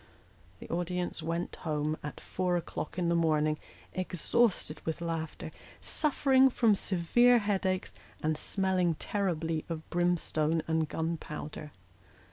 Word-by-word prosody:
The - - -9
audience 175 0 -2
went 165 +2 -3
home 155 -1 -1
at 150 - -6
four 180 -1 -1
o'clock 170 -1 -5
in 175 -2 +1
the 170 - +3
morning, 155 -2 +2 0.3
exhausted 185 -1 +1
with 160 +1 -3
laughter, 165 -1 -4 0.3
suffering 270 -3 +3
from 230 -4 +4
severe 205 +7 +4
headaches, 195 -3 0 0.3
and 155 0 +2
smelling 185 0 +1
terribly 165 -4 -1
of 160 -1 -5
brimstone 165 -2 +1
and 160 -1 +1
gunpowder. 155 -2 -4
170 Hz, 115 wpm, -31 LUFS, 160-185 Hz, 0.3 s, from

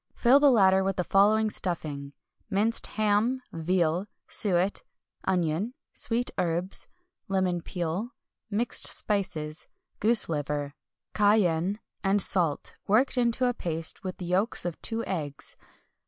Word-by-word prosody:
Fill 255 +3 +5
the 290 0 +6
latter 190 -6 +5
with 195 0 -1
the 180 - 0
following 215 +3 +3
stuffing: 145 -7 -3 0.4
minced 220 +3 +2
ham, 215 +4 +2
veal, 170 +2 0 0.2
suet, 190 -1 0 0.4
onion, 185 +5 0 0.2
sweet 240 +1 0
herbs, 175 +1 -1 0.4
lemon 185 -3 0
peel, 175 +7 -3 0.4
mixed 220 +3 +1
spices, 160 -7 -2 0.3
goose 220 +1 +4
liver, 145 -2 -3 0.4
cayenne, 205 -2 +2 0.2
and 195 +1 +3
salt, 175 -7 +1
worked 240 +8 +3
into 245 0 +2
a 245 - +2
paste 165 -7 -2
with 185 -1 -5
the 180 - -6
yolks 185 +6 0
of 175 -2 -4
two 230 0 -1
eggs. 150 -7 -4
190 Hz, 125 wpm, -27 LUFS, 170-215 Hz, 0.4 s, the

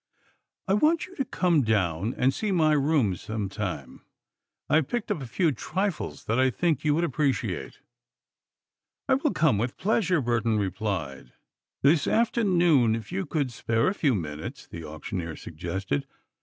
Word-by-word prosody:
I 190 - +2
want 310 +11 +3
you 375 - -15
to 270 - 0
come 175 -9 +2
down 100 -2 0
and 130 +1 +2
see 215 -2 -2
my 160 -4 +3
rooms 140 - +2
sometime. 100 -9 -4 0.6
I 155 - +4
have 155 - +1
picked 240 -3 -2
up 150 - -1
a 130 - -6
few 160 +6 +1
trifles 190 - -3
that 115 +3 0
I 130 0 +4
think 160 +2 0
you 150 -1 +3
would 170 - +1
appreciate." 145 -3 -1 1.3
"I 270 - +4
will 275 +3 +2
come 150 -9 +2
with 120 +3 -2
pleasure," 190 -4 +2
Burton 115 -3 +1
replied. 90 - -3 0.5
"This 145 +1 +4
afternoon, 175 - +3
if 115 +6 -7
you 190 0 -2
could 145 -6 -1
spare 115 +4 +1
a - - -1
few 145 - +1
minutes?" 75 -4 -5
the 85 - -9
auctioneer 80 +2 -5
suggested. 85 -2 -4
130 Hz, 155 wpm, -27 LUFS, -, 1.3 s, I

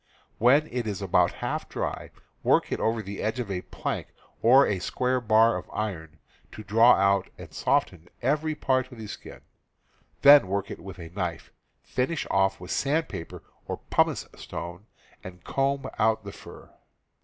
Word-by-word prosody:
When 140 +7 +5
it 120 -2 -2
is 100 -2 -3
about 100 -3 +2
half - - -3
dry, - - -4 0.3
work - - +2
it - - -1
over 115 0 0
the 100 0 -6
edge 110 +3 -2
of 115 -5 -3
a 90 -1 -2
plank - - -4 0.3
or 130 +4 +7
a 100 - -1
square 125 +7 -1
bar 115 0 +4
of - - -9
iron, 80 -7 -4 0.4
to 110 - -9
draw 115 +4 +6
out 100 0 +2
and - - -11
soften 85 0 0
every 150 +4 0
part 130 -2 0
of 125 - -11
the 110 - -7
skin; 105 - -10 0.8
then 145 -6 +9
work 100 +1 -2
it - - -7
with 95 0 -10
a 85 -3 -9
knife, 90 -4 -4 0.3
finish 140 +6 -2
off 95 0 +2
with 90 - -8
sandpaper 140 - -2 0.2
or - - -3
pumice - - +2
stone, 85 +5 -8 0.4
and 90 -2 -11
comb 135 0 -1
out 110 0 +2
the - - -7
fur. - - -13
110 Hz, 165 wpm, -26 LUFS, 95-130 Hz, 0.8 s, then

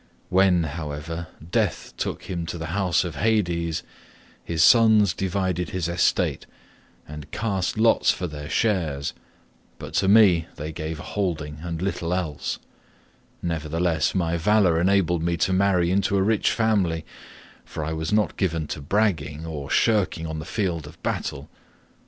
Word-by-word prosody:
When, 90 -2 +4
however, 80 +2 -5 0.2
death - - -1
took - - -4
him 85 -3 -4
to 85 - -4
the 80 0 -5
house 95 -3 +2
of 90 -3 -6
Hades, 85 -7 0 0.6
his 80 -2 +1
sons 110 -5 +6
divided 95 -1 -1
his 90 -3 -2
estate 85 0 +1 0.6
and 75 0 -9
cast 100 -1 -2
lots 115 +1 +4
for 90 - +1
their 75 -2 -7
shares, 80 -10 0 0.6
but - - -9
to 95 - +2
me 95 -6 +5
they 75 +1 -5
gave 80 0 -5
a - - -7
holding 80 -7 -3
and 85 0 -4
little 90 -2 -1
else; 80 -6 -3 0.9
nevertheless, 80 0 0
my 85 -2 +1
valour 90 -2 +3
enabled 90 -3 +2
me 85 +1 0
to 95 - +1
marry 95 -2 +2
into 100 +1 +2
a 95 - +3
rich 110 +1 +2
family, 95 -8 +1 0.6
for 80 - -5
I 80 - -3
was 80 0 -3
not 105 0 +1
given 85 -5 0
to 75 - -4
bragging, 80 -4 0
or 75 -4 -6
shirking 100 -7 +2
on 80 -1 -4
the 75 - -7
field 85 -8 -2
of 80 +2 -14
battle. 70 +2 -3
85 Hz, 150 wpm, -24 LUFS, 80-95 Hz, 0.9 s, sons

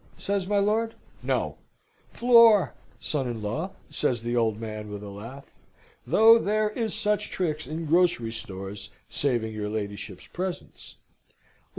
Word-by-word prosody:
says 200 -2 -2
my 205 0 +1
lord. 220 +3 +1 0.3
"No; - - -1 0.5
floor, 230 - +6 0.3
son 140 -4 -1
in 115 -3 -4
law!" 155 - -3 0.2
says 120 -6 0
the 120 +1 -1
old 110 -3 +1
man, 110 -1 -6
with 105 0 -6
a 100 - -7
laugh; 115 +8 -11 0.5
"though 225 - +7
there 215 0 +1
is 225 0 -2
such 210 -1 0
tricks, 155 -6 -2
in 160 +3 -4
grocery 165 -8 +2
stores, 100 -2 -7 0.2
saving 120 -6 -1
your 105 -1 -3
ladyship's 100 -3 -5
presence." 180 0 -6
145 Hz, 135 wpm, -26 LUFS, -, 0.5 s, though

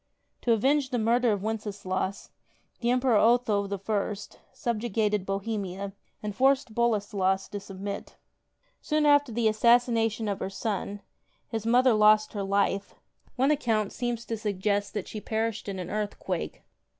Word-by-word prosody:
To 240 - +1
avenge 270 +5 +2
the 250 - -1
murder 235 +1 +3
of 200 -2 -1
Wenceslaus, 200 -3 -3 0.5
the 235 - 0
Emperor 250 -2 +3
Otho 220 -3 +3
I. 200 +1 -1 0.4
subjugated 215 -3 -1
Bohemia 195 -1 -3 0.3
and 210 -1 -4
forced 265 -1 +2
Boleslas 205 -4 +1
to 205 - -5
submit. 195 0 -7 0.7
Soon 305 -1 +1
after 290 -3 +4
the 230 0 +1
assassination 225 0 +3
of 200 -1 -2
her - - -3
son, 200 0 -3 0.5
his 225 -1 -3
mother 250 +1 +5
lost 215 0 +5
her 205 - -3
life: 200 0 0 0.4
one 270 +3 +3
account 225 -8 0
seems 240 -2 -3
to 225 - -3
suggest 205 -1 -1
that 205 - -3
she 215 - -6
perished 220 -1 -2
in 195 - -4
an 180 -1 -5
earth 210 -1 -2
quake. - - -4
215 Hz, 145 wpm, -28 LUFS, 200-235 Hz, 0.7 s, mother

